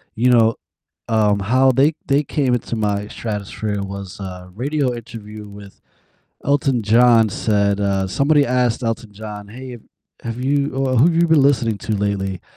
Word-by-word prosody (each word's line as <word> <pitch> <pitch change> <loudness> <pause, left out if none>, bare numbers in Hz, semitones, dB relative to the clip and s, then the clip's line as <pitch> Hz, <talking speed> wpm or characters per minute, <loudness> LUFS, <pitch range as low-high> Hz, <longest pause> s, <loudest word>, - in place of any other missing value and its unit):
You 125 +3 +2
know, 115 -1 +4 0.5
um, 105 -2 +2
how 130 +6 +3
they 140 +5 +3
they 140 +2 +2
came 135 -3 0
into 120 -1 -2
my 105 -2 -1
stratosphere 105 -1 -4
was 100 0 -7
a 90 -1 -8
radio 135 +3 -1
interview 110 -2 -9
with 100 -1 -13 0.6
Elton 135 -3 +1
John 115 0 +4
said, 100 -1 0
uh 95 -1 0
somebody 140 +8 +2
asked 125 -1 0
Elton 115 -1 -3
John, 105 -1 -8
"Hey, 130 +3 -9
have 120 -3 -10 0.4
have 115 +2 -5
you, 140 +1 +1
uh 130 -1 0
who've 165 +7 +4
you 170 +1 +3
been 160 -3 +4
listening 120 -6 +2
to 110 - -3
lately? 100 -2 -2
115 Hz, 160 wpm, -19 LUFS, 100-130 Hz, 0.6 s, know